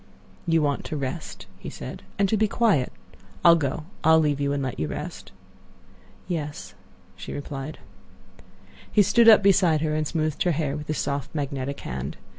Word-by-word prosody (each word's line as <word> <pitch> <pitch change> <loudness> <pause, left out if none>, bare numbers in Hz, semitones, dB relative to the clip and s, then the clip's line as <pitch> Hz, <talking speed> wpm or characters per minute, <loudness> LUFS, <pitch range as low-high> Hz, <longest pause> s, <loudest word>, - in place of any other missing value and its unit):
"You 165 -2 +3
want 145 -1 0
to 155 - -4
rest," 130 - -5
he - - -7
said, - - -8 0.2
"and 200 - +3
to 220 - +1
be 215 +1 +3
quiet. 200 - +2 0.5
I'll 170 - +9
go; 150 0 -2 0.2
I'll 160 +1 +6
leave 145 -2 +1
you 140 0 +1
and 140 -1 -1
let 130 - -4
you 80 - -1
rest." 65 - -6 1.0
"Yes," 150 - -4 0.4
she 95 - -8
replied. 145 +1 -6 1.1
He 210 - +5
stood 225 +4 +6
up 210 -2 +8
beside 180 -5 +4
her 155 -1 0
and 155 0 0
smoothed 155 -1 -2
her 175 - +3
hair 145 -2 -1
with 150 0 -6
his 155 - -2
soft, 140 +2 -3
magnetic 140 -1 -3
hand. 65 0 -5
150 Hz, 175 wpm, -25 LUFS, 140-170 Hz, 1.1 s, I'll